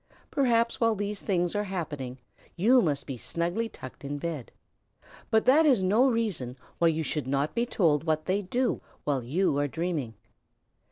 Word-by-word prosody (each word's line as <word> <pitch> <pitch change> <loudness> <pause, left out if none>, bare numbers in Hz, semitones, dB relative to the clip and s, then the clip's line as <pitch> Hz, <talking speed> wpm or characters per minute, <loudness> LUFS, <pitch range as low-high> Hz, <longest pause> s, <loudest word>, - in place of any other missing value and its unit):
Perhaps 235 -5 +2
while 230 -1 +3
these 205 0 -3
things 175 -3 0
are 205 0 0
happening 145 -9 -4 0.4
you 240 +8 +5
must 145 - 0
be 135 -3 -5
snugly 170 - -2
tucked 130 - -11
in 145 +1 -3
bed. 155 -5 -5 0.8
But 220 0 +3
that 280 +6 +6
is 260 -11 +4
no 220 +8 +4
reason 200 - -1 0.2
why 170 - +5
you 160 0 +1
should 150 -3 -2
not 140 +2 0
be 235 +1 0
told 160 - +2
what 155 -1 0
they 190 +2 +1
do 245 +7 -1 0.2
while 140 -3 0
you 145 +3 +1
are 145 - +1
dreaming. 155 -7 -3
175 Hz, 170 wpm, -28 LUFS, 145-220 Hz, 0.8 s, that